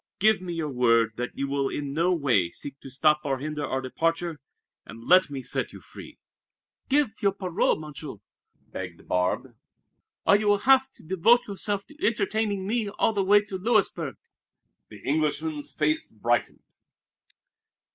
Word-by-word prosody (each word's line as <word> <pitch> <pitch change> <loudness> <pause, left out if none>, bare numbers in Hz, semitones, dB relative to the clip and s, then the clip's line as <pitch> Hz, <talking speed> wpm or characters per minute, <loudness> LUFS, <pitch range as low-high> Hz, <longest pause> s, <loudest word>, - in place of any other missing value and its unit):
Give 215 -1 +3
me 180 -2 -5
your 160 -3 -3
word 115 -3 +3
that 125 0 -4
you 140 - -1
will 140 -1 0
in 140 -1 -4
no 170 +4 +2
way 130 - +2
seek 140 +8 -8
to - - -11
stop 150 +3 +2
or 135 -2 -1
hinder 150 +2 -4
our 130 -2 -2
departure, 165 +4 -1 0.4
and 115 +1 -12
let 185 -2 +6
me 135 -2 -6
set - - -2
you - - -10
free!" - - -13 0.7
"Give 280 -4 +3
your 200 -2 +2
parole, 185 -3 0
Monsieur!" 150 -2 -8 0.4
begged - - -9
Barbe, 90 0 -1 0.7
"or 200 - +6
you 210 +1 +1
will 205 0 +5
have 265 0 +5
to - - -17
devote 190 +8 +3
yourself 200 0 -3
to 300 0 -15
entertaining 215 -3 0
me 220 0 -1
all 215 +2 +1
the 200 -2 +1
way 205 +2 +5
to 195 -2 -5
Louisburg." 190 - +1 0.7
The 105 -2 -13
Englishman's 150 +1 0
face 155 0 0
brightened. 115 +1 -1
160 Hz, 160 wpm, -26 LUFS, 140-200 Hz, 0.7 s, let